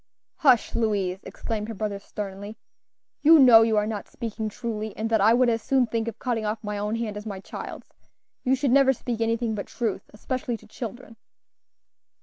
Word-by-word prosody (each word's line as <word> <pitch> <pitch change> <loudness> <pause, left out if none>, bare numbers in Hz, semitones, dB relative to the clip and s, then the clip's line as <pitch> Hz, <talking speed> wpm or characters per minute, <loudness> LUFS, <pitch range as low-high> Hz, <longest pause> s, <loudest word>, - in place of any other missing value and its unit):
"Hush, 255 -8 +4
Louise!" 200 -5 0
exclaimed 215 -2 -5
her 225 - -6
brother, 205 -1 -3
sternly; 200 +1 -7 0.6
"you 320 +2 +8
know 245 -5 +8
you 225 -1 +2
are 210 - +2
not 215 -2 -4
speaking 220 -2 -5
truly, 220 -1 -5
and 225 +1 -2
that 220 -2 +3
I 220 +3 +6
would 250 0 +4
as 230 -1 +1
soon 265 +2 +2
think 230 0 -2
of 230 - -5
cutting 240 -4 -2
off 215 +1 -3
my 210 -1 -3
own 210 +2 -1
hand 225 -3 -3
as 210 +1 -7
my 200 -2 -5
child's. - - -9 0.5
You 260 0 +3
should 270 -1 0
never 270 0 +5
speak 235 -2 -4
anything 230 0 0
but 205 -2 -4
truth, 225 -5 -3
especially 240 +2 -3
to 220 - -18
children." 230 +1 -8
225 Hz, 190 wpm, -25 LUFS, 210-240 Hz, 0.6 s, you